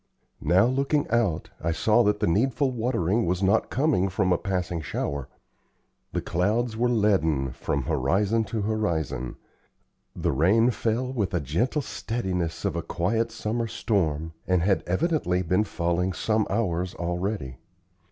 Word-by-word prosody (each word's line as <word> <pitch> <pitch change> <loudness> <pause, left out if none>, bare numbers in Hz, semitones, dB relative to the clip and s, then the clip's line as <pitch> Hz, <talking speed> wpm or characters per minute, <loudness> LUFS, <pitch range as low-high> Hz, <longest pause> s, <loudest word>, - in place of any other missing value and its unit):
Now, 95 +4 +4
looking 140 +4 +1
out, 115 -9 +1
I 85 - +1
saw 110 +8 +3
that 105 - +1
the - - +3
needful 130 - +2
watering 115 -4 0
was 90 +2 0
not 100 +3 +3
coming 130 -9 +2
from 95 -1 +1
a - - +2
passing 90 -4 -2
shower. 70 -2 -3 0.8
The - - -1
clouds 110 +7 0
were 120 +2 +1
leaden 80 - +2
from 70 +2 -2
horizon 105 - +1
to 105 +1 -3
horizon; 80 - -1 0.8
the - - 0
rain 105 - +4
fell 120 +3 -1
with 100 -8 -1
a - - +2
gentle 110 - 0
steadiness 95 -11 -3
of - - 0
a - - -1
quiet 115 +6 -1
summer 115 +1 -2
storm, 80 -8 -1
and 90 -2 +2
had 95 +1 +2
evidently 95 - +1
been 90 +5 +2
falling 85 +1 -1
some 110 +1 0
hours 90 -5 -1
already. 85 -5 -3
100 Hz, 145 wpm, -26 LUFS, 85-115 Hz, 0.8 s, Now